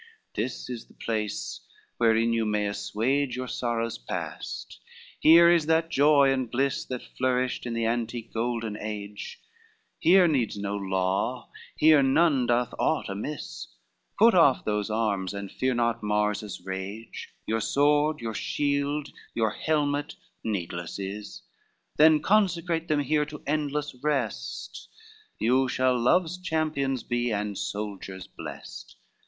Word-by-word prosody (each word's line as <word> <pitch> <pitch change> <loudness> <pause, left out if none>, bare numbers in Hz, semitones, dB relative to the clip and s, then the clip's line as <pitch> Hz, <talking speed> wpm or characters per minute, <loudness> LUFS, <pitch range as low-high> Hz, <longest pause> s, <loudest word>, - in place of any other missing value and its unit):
LXIII 105 - +1
"This 125 - -5
is 120 -2 -6
the - - -21
place 110 -2 -3 0.4
wherein 115 0 +3
you 115 -1 +1
may 105 -1 0
assuage 125 +6 -1
Your 130 0 -4
sorrows 115 -2 -2
past, - - -6 0.4
here 170 +2 +8
is 170 -3 +4
that 165 +1 +2
joy 140 -2 +5
and 130 -3 -2
bliss 135 +3 0
That 125 -1 -5
flourished 125 -1 -1
in 115 - -3
the 115 0 0
antique 115 0 -2
golden 115 -2 -2
age, 105 -1 -6 0.6
Here 180 +2 +6
needs 130 -9 0
no 100 0 -3
law, 95 +5 -1 0.2
here 155 -1 +6
none 135 -1 +3
doth 120 0 +1
aught - - +1
amiss: 100 - -5 0.5
Put 230 +2 +6
off 165 -8 +5
those 105 0 -1
arms 105 -3 -1
and 100 -1 -6
fear 130 -1 0
not 115 -1 0
Mars 105 0 +1
his 105 -4 -7
rage, 95 +4 -6 0.2
Your 115 0 0
sword, 150 +3 +2
your 115 -1 -3
shield, 145 +3 -1 0.3
your 110 -2 +1
helmet 145 +2 -1 0.3
needless 85 -5 -3
is; 100 +2 -6 0.5
Then 155 0 +6
consecrate 175 -5 +2
them 150 -1 +2
here 150 +1 +1
to 150 -1 -9
endless 150 0 -1
rest, 140 -7 -3 0.5
You 130 +3 +2
shall 130 0 +2
love's 170 +8 +2
champions 155 -7 -1
be, 120 0 -1
and 105 -1 -2
soldiers 100 -2 -5
blest. - - -9
120 Hz, 135 wpm, -27 LUFS, 105-145 Hz, 0.6 s, here